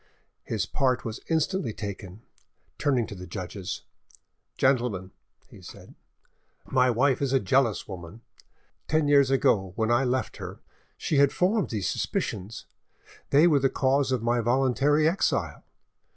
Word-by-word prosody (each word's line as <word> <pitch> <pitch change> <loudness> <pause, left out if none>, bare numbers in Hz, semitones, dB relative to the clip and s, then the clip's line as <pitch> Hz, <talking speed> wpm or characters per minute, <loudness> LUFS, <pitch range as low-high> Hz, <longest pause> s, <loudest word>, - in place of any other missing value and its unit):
His - - -2
part 130 -2 0
was 110 -1 -5
instantly 160 - 0
taken. 100 0 -7 0.6
Turning 130 -6 +1
to - - -9
the 90 -1 -9
judges— 95 +1 -6 0.7
"Gentlemen," 120 -8 +1 0.4
he - - -15
said, - - -13 0.7
"my 130 0 +2
wife 130 +3 +2
is 135 -1 0
a 135 - +4
jealous 115 +1 +1
woman! 95 +3 -9 0.7
Ten 155 0 +1
years 140 -2 +5
ago, 100 -8 +2
when 110 +1 0
I 120 +3 +3
left 130 0 -1
her, - - -8 0.4
she 150 - -1
had 140 0 +5
formed 200 +4 +1
these 105 -6 -2
suspicions; 100 +4 -3 0.6
they 145 +4 +5
were 155 -5 +4
the 135 0 +2
cause 135 +1 +1
of 125 -3 0
my 120 +1 +1
voluntary 135 +5 +2
exile. 170 +4 -1
125 Hz, 140 wpm, -26 LUFS, 110-140 Hz, 0.7 s, years